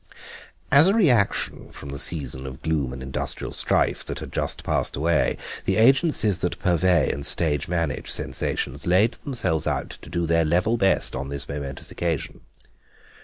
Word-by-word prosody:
As 145 +5 +7
a 195 - +3
reaction 125 - +1
from 70 - -10
the 70 0 -5
season 70 -5 0
of 65 0 -10
gloom 75 -5 -1
and 65 0 -7
industrial 65 0 -4
strife - - +2
that - - -5
had - - -8
just - - -2
passed - - -1
away 80 +2 +1 0.3
the - - +1
agencies 115 - +3
that 90 - -2
purvey 90 -3 +2
and 70 - -5
stage 75 -3 +2
manage 85 -4 -2
sensations - - -2
laid 95 +6 +3
themselves 115 - -1
out - - -2
to - - -11
do 85 -1 -1
their 85 0 +2
level 90 +8 +1
best 95 -4 +2
on 70 +1 -4
this 70 -1 -5
momentous 70 -1 -5
occasion. 85 -5 -3
85 Hz, 165 wpm, -24 LUFS, 70-100 Hz, 0.3 s, As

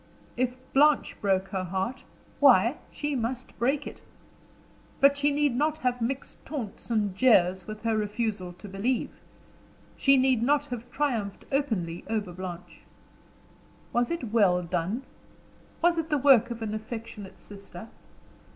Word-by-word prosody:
If 250 0 0 0.2
Blanche 295 +1 +4
broke 195 -1 +1
her 190 -1 -2
heart 190 +8 -3 0.3
why, - - +6
she 295 -1 -3
must 245 +1 -3
break 275 +4 +1
it. - - -9 1.0
But 280 +1 +6
she 285 +1 +2
need 290 -3 +1
not 305 +4 +1
have 250 -5 -1
mixed 260 +4 -4
taunts 260 -9 -6
and 210 -4 0
jeers 190 -6 +4
with 215 0 -7
her 225 -1 +1
refusal 210 -3 -2
to 190 +4 -12
believe; 205 +6 -1 0.8
she 275 -1 +4
need 260 -3 +3
not 290 +4 +2
have 245 -4 -7
triumphed 230 -9 -2
openly 215 - -1
over 210 -5 -2
Blanche. 180 -1 -8 1.1
Was 240 0 +2
it 255 -11 -4
well 185 -6 +4
done? 180 +8 -2 0.8
Was 345 -1 +4
it 320 0 -3
the 300 - +2
work 260 -4 +5
of 230 -1 -5
an 215 -1 -3
affectionate 215 -2 -7
sister! 200 0 -10
230 Hz, 140 wpm, -27 LUFS, 195-270 Hz, 1.1 s, why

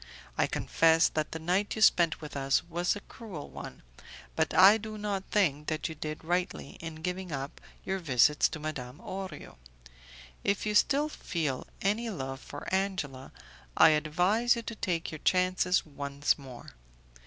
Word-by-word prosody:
I - - +2
confess 165 0 +3
that 155 -1 -2
the - - -4
night 180 +6 0
you 220 - -4
spent 170 -5 +4
with 150 -2 -8
us 135 +1 +1
was 175 +2 -1
a 205 - -7
cruel 200 - -9
one, - - -9 0.5
but 160 0 +1
I 195 +4 +7
do 215 0 -7
not 205 -2 -3
think 150 -8 +1
that 155 -1 -1
you - - -5
did 155 0 -6
rightly 175 -3 -2
in 160 -1 -8
giving 180 0 -3
up 140 -1 -5 0.2
your 190 0 -1
visits 145 -3 +4
to 160 - -6
Madame 140 -4 -5
Orio. 185 -3 -7 0.9
If 200 +1 0
you 210 - 0
still 285 +7 +3
feel 160 - -3 0.2
any 215 +4 +1
love 135 -8 -5
for 145 +1 -9
Angela, 180 -9 -2 0.5
I - - +8
advise 180 +11 +2
you 235 - -5
to 230 - -6
take 170 -5 -2
your 155 - -7
chances 185 +1 +2
once 140 -1 -1
more. 130 -4 -11
165 Hz, 165 wpm, -30 LUFS, 150-195 Hz, 0.9 s, I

